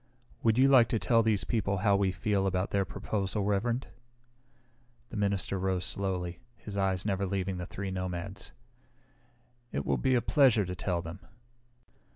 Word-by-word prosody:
Would 115 0 +3
you 130 +1 +6
like 130 -4 +6
to 115 - 0
tell 110 +4 +3
these 110 -4 +1
people 100 -2 0
how 100 +1 +3
we 100 -1 +2
feel 95 +1 0
about 90 0 -1
their 100 -1 +1
proposal, 100 +2 -2
Reverend?" 115 +5 0 1.3
The - - -7
minister 100 -1 0
rose 95 -1 0
slowly, 90 -3 -3 0.2
his 105 - -9
eyes 95 -2 0
never 100 -2 0
leaving 95 -1 -2
the 90 0 -5
three 100 0 -5
nomads. 95 +1 -5 1.2
"It 70 - -3
will 70 -3 +1
be 130 - +2
a - - +4
pleasure 125 -7 +4
to 90 - -4
tell 85 -1 -1
them." 80 +1 -7
100 Hz, 165 wpm, -30 LUFS, 90-105 Hz, 1.3 s, you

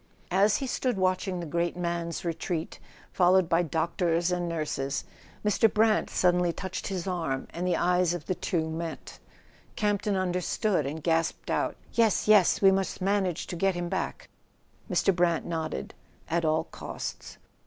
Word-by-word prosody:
As 200 +3 +4
he 275 - -3
stood 250 -3 -1
watching 185 0 0
the 170 - -4
great 170 +3 -1
man's 170 -1 -3
retreat, 170 0 -3 0.3
followed 185 0 +4
by 170 0 +3
doctors 170 +1 0
and 175 -1 -1
nurses, 150 -4 -2 0.4
Mr. 210 +1 +4
Brant 215 0 +3
suddenly 180 -1 +2
touched 190 +2 -5
his 185 -4 -3
arm, 165 -8 -2
and 175 +2 -3
the 180 - +2
eyes 180 0 +2
of 170 - -7
the 185 - 0
two 165 -2 -1
met. 160 0 -6 0.6
Campton 205 -1 0
understood 180 - 0
and 150 +2 -5
gasped 165 -1 0
out: - - 0 0.2
"Yes, 225 -3 +2
yes; 210 -2 +5
we 195 - +8
must 195 0 -1
manage 190 -3 0
to 180 - -6
get 195 +2 +1
him 175 0 -3
back." - - -3 0.6
Mr. 195 - +2
Brant 170 -2 +2
nodded. 160 - -4 0.3
"At 165 0 0
all 155 0 +2
costs." - - -7
175 Hz, 155 wpm, -28 LUFS, 165-190 Hz, 0.6 s, we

